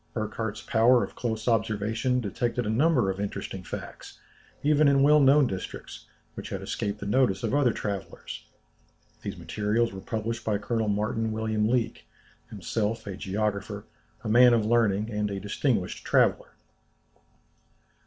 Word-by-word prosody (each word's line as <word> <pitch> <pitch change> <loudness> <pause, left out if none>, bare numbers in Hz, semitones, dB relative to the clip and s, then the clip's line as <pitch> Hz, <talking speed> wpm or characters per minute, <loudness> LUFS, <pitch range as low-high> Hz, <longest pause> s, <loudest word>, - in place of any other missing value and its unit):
Burckhardt's 110 0 -3
power 120 +2 +4
of - - -6
close 110 -2 -3
observation 115 +2 +1
detected 120 +3 -2
a 105 - 0
number 125 -4 +3
of 95 - -7
interesting 100 -1 -4
facts, 90 - -8 0.5
even 150 0 +4
in 140 -1 +4
well 150 +1 +6
known 140 +1 +6
districts, 95 -6 -6 0.3
which - - -7
had - - -4
escaped 100 0 -3
the 100 - -6
notice 105 -3 +2
of - - -1
other 140 -4 +3
travellers. 100 -4 -5 0.8
These - - -5
materials 110 +2 -1
were 95 - -7
published 115 +1 -3
by 105 -2 0
Colonel 110 +1 -1
Martin 105 +2 -1
William 110 -1 0
Leake, 120 -2 -1 0.4
himself 105 +3 -2
a 100 -2 -5
geographer, 100 0 -3 0.4
a - - -4
man 120 +2 +6
of 110 -2 +1
learning, 110 -2 +2
and 105 -1 -1
a 100 -1 -4
distinguished 105 -1 -1
traveller." - - +2
110 Hz, 145 wpm, -27 LUFS, 105-120 Hz, 0.8 s, well